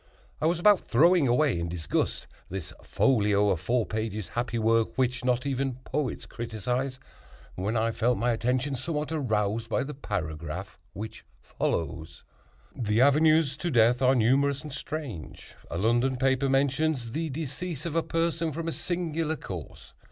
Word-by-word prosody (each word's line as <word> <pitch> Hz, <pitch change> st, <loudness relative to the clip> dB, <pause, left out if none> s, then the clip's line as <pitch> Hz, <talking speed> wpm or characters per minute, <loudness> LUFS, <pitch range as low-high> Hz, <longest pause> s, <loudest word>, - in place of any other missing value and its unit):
I 155 Hz, -, +3 dB
was 170 Hz, 0 st, +1 dB
about 205 Hz, +1 st, +6 dB
throwing 165 Hz, +4 st, +4 dB
away, 125 Hz, -, +2 dB
in 85 Hz, 0 st, -2 dB
disgust, 80 Hz, -4 st, -1 dB, 0.2 s
"This 95 Hz, -3 st, -5 dB
folio 105 Hz, -5 st, +2 dB
of 95 Hz, -4 st, +1 dB
four 115 Hz, +5 st, +1 dB
pages, 110 Hz, -2 st, -3 dB
happy 120 Hz, 0 st, -2 dB
work 115 Hz, +1 st, +2 dB
Which 125 Hz, -1 st, 0 dB
not 125 Hz, +1 st, +1 dB
even 135 Hz, -2 st, -1 dB
critics 140 Hz, -1 st, -2 dB
criticise," 125 Hz, +3 st, -3 dB, 0.5 s
when 105 Hz, +5 st, -1 dB
I 115 Hz, +1 st, +1 dB
felt 120 Hz, +2 st, +1 dB
my 120 Hz, +4 st, +1 dB
attention 125 Hz, +4 st, 0 dB
somewhat 150 Hz, +4 st, -3 dB
aroused 110 Hz, -6 st, 0 dB
by 115 Hz, -, +1 dB
the 150 Hz, +2 st, -6 dB
paragraph 85 Hz, -, -5 dB
which 110 Hz, +2 st, -7 dB, 0.2 s
follows: 80 Hz, -1 st, -3 dB, 0.5 s
"The 110 Hz, -2 st, 0 dB
avenues 150 Hz, +1 st, +4 dB
to 175 Hz, +3 st, -2 dB
death 120 Hz, -2 st, +4 dB
are 130 Hz, +1 st, +5 dB
numerous 140 Hz, +5 st, +2 dB
and 150 Hz, -3 st, -7 dB
strange. 140 Hz, -, -6 dB, 0.2 s
A 85 Hz, -, -3 dB
London 120 Hz, +6 st, +2 dB
paper 135 Hz, +1 st, +2 dB
mentions 135 Hz, -2 st, +1 dB
the 160 Hz, +5 st, -2 dB
decease 155 Hz, +2 st, -4 dB
of 165 Hz, -2 st, -3 dB
a 165 Hz, -, +3 dB
person 165 Hz, 0 st, -1 dB
from 165 Hz, +3 st, -4 dB
a -, -, 0 dB
singular 165 Hz, -3 st, -2 dB
cause. 90 Hz, -, -8 dB
125 Hz, 155 wpm, -28 LUFS, 110-150 Hz, 0.5 s, about